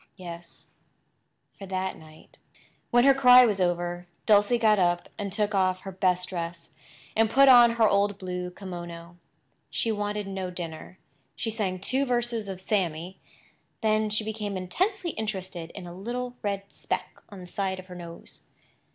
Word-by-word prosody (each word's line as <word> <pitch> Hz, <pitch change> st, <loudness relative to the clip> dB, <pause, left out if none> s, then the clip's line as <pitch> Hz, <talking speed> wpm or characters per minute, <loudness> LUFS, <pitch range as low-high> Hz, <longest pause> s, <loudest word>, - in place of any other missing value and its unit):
Yes, 170 Hz, -2 st, -10 dB, 0.9 s
for 195 Hz, -, -8 dB
that 190 Hz, 0 st, -2 dB
night. 155 Hz, 0 st, -17 dB, 0.5 s
When 240 Hz, 0 st, +5 dB
her 275 Hz, +1 st, +7 dB
cry 250 Hz, -2 st, +8 dB
was 205 Hz, -4 st, 0 dB
over 175 Hz, 0 st, -1 dB, 0.2 s
Dulcie 210 Hz, +2 st, +5 dB
got 215 Hz, -3 st, +4 dB
up 175 Hz, -1 st, +1 dB
and 200 Hz, -1 st, -3 dB
took 210 Hz, +2 st, 0 dB
off 185 Hz, -1 st, +1 dB
her 195 Hz, -, -7 dB
best 180 Hz, -1 st, +1 dB
dress, 170 Hz, -2 st, -6 dB, 0.4 s
and 220 Hz, 0 st, +3 dB
put 275 Hz, +4 st, +6 dB
on 240 Hz, -2 st, +8 dB
her 230 Hz, -2 st, +4 dB
old 200 Hz, 0 st, +2 dB
blue 180 Hz, -1 st, -4 dB
kimono. 175 Hz, -2 st, -8 dB, 0.5 s
She 230 Hz, -, -1 dB
wanted 210 Hz, -1 st, -2 dB
no 190 Hz, -1 st, -4 dB
dinner. 175 Hz, 0 st, -7 dB, 0.4 s
She 225 Hz, -, -2 dB
sang 200 Hz, -4 st, -2 dB
two 255 Hz, +9 st, 0 dB
verses 240 Hz, -4 st, -1 dB
of 190 Hz, -1 st, -5 dB
"Sammy." 185 Hz, -2 st, -2 dB, 0.6 s
Then 215 Hz, 0 st, +2 dB
she 215 Hz, +1 st, 0 dB
became 210 Hz, -2 st, -3 dB
intensely 360 Hz, -, -1 dB
interested 190 Hz, -, -5 dB
in -, -, -7 dB
a 175 Hz, -, -8 dB
little 245 Hz, +6 st, -4 dB
red 200 Hz, -1 st, -2 dB
speck -, -, -4 dB
on 200 Hz, -3 st, -10 dB
the 180 Hz, -, -9 dB
side 190 Hz, 0 st, -2 dB
of 185 Hz, -, -9 dB
her 185 Hz, -, -11 dB
nose. 170 Hz, -1 st, -10 dB
195 Hz, 160 wpm, -27 LUFS, 180-220 Hz, 0.9 s, cry